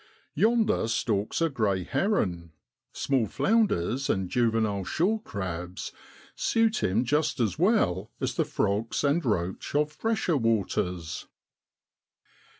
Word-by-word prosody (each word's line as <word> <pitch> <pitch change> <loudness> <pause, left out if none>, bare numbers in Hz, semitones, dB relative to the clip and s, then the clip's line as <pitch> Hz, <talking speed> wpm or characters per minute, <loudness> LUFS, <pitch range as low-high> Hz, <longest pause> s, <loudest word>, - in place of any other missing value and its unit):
Yonder 220 - +2
stalks 110 +1 -1
a 165 - +2
grey 105 -9 0
heron 90 - -1 0.4
small 130 -5 0
flounders 135 - +1
and 95 -1 0
juvenile 110 -5 +1
shorecrabs 95 - -2 0.4
suit 225 -1 +1
him 110 +7 +1
just 150 +3 +1
as 115 +3 0
well 135 - +2
as - - -1
the - - +1
frogs 105 +3 -1
and 145 +4 +2
roach 95 0 -2
of 150 0 +2
fresher 215 -2 0
waters. 90 - -1
115 Hz, 110 wpm, -27 LUFS, -, 0.4 s, Yonder